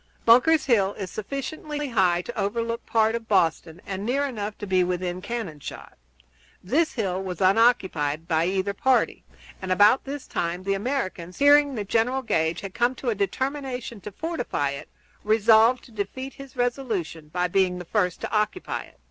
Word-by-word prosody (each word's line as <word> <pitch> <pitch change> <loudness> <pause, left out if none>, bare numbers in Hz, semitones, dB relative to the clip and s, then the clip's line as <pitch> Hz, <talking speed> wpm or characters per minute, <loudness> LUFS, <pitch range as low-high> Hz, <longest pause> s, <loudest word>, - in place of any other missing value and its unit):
Bunker's 265 +7 +5
Hill 205 -7 +3
is 190 -3 -6
sufficiently 290 +5 -5
high 180 -6 +2
to - - -7
overlook 230 +3 -2
any - - -24
part 220 -1 +3
of 230 -1 -4
Boston 170 -3 +1
and 195 0 -4
near 270 +6 0
enough 215 -6 -4
to - - -6
be 185 -2 +2
within 180 0 -2
cannon 200 -8 -5
shot. - - -9 0.7
This 305 - +1
hill 190 -5 -2
was 185 -3 -5
unoccupied 185 -7 +2
by 160 0 +2
either 190 +2 -1
party, 260 +5 +1 0.4
and 190 -1 -4
about 205 +7 +5
this 280 0 -6
time 175 +2 -3
the 195 +1 0
Americans, 195 -6 -3
hearing 285 -1 +5
that 205 -3 -4
General 245 +5 +1
Gage 160 -6 0
had 195 -2 -7
come 240 +2 +1
to 250 -2 -2
a - - +1
determination 250 +2 -3
to 210 - -7
fortify 245 - -2
it, 140 - -8 0.3
resolved 220 +3 +4
to 245 - -16
defeat 230 +6 -5
his 275 -1 -12
resolution 230 - -2
by 180 +3 -1
being 180 0 +1
the 180 - -7
first 180 -2 0
to - - -4
occupy 215 +12 -1
it. - - -22
210 Hz, 175 wpm, -25 LUFS, 185-250 Hz, 0.7 s, Bunker's